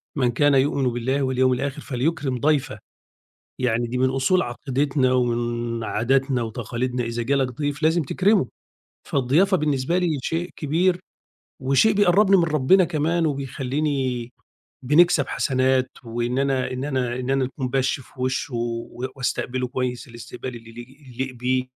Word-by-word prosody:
"من 125 -4 +2
كان 145 +4 +3
يؤمن 135 -1 +2
بالله 125 +4 -1
واليوم 130 0 +2
الآخِر 140 +3 -3
فليكرِم 135 0 -1
ضَيْفَه." 150 -1 0 0.8
يعني 120 -1 +1
دي 125 +2 -3
من 130 +1 +2
أُصول 135 +8 +2
عقيدتنا 130 +1 0
ومن 120 -2 -1
عاداتنا 130 +3 +1
وتقاليدنا، 120 +2 -3
إذا 115 0 -3
جا 140 +4 +1
لك 135 -2 +1
ضيف 145 0 -2
لازم 160 +2 +3
تكرِمه، 185 - +2 0.6
فالضيافة 155 +9 +3
بالنسبة 150 +2 0
لي 170 -5 0
شيء 165 +6 -2
كبير 175 +5 +1 0.6
وشيء 135 +12 +3
بيقرّبني 200 0 +5
من 175 - +3
ربنا 160 +4 +4
كمان، 165 +1 0
وبيخلّيني 135 -2 -2 0.5
بنكسَب 150 +1 +4
حسنات 130 0 +1
وإن 120 +2 -2
أنا 135 -2 0
إن 130 +1 -4
أنا 130 -4 -1
إن 125 +1 -3
أنا 135 -1 +2
نكون 130 0 -4
بَش 135 +1 0
في 130 - -17
وِشّه 130 0 -2
و 120 +1 -3
وأستقبله 125 0 -2
كويس 125 0 -3
الاستقبال 120 +1 -8
اللي 115 -1 -12
ل 115 - -14
ي 130 +4 -12
يليق 130 +1 -4
بيه 125 +1 0
130 Hz, 150 wpm, -23 LUFS, 125-150 Hz, 0.8 s, بيقرّبني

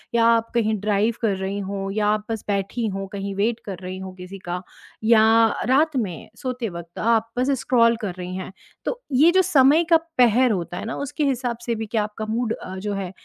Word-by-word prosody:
या 230 -1 +4
आप 230 0 +3
कहीं 220 -2 +2
ड्राइव 210 +2 +1
कर 215 -4 +1
रही 195 +1 -3
हो 195 0 -4
या 210 -1 +1
आप 210 0 +1
बस 220 - -3
बैठी 200 +3 -1
हो 195 0 -3
कहीं 200 0 -4
वेट 220 +4 0
कर 195 -3 -5
रही 185 +1 -6
हो 190 0 -7
किसी 185 +1 -10
का 175 +1 -3 0.4
या 225 -1 +6 0.5
रात 300 +3 +3
में 190 -9 -3
सोते 250 -3 -3
वक़्त 170 -1 -9
आप 230 0 +2
बस 255 +3 +1
स्क्रॉल 235 -2 +3
कर 200 -4 -3
रही 180 0 -5
हैं, 185 0 -6 0.3
तो - - -3
ये 305 +7 +6
जो 375 - +5
समय 295 -1 +5
का 330 - +8 0.2
पहर 245 +1 +5
होता 175 -3 -3
है - - -5
ना 225 - -4
उसके 285 +2 -2
हिसाब 250 -3 -1
से 235 - 0
भी 220 0 -4
क्या 220 0 0
आपका 210 +1 -5
मूड 230 0 0
अ, 185 - -8
जो 205 +2 -3
है 195 -2 -4
220 Hz, 220 wpm, -23 LUFS, 195-240 Hz, 0.5 s, का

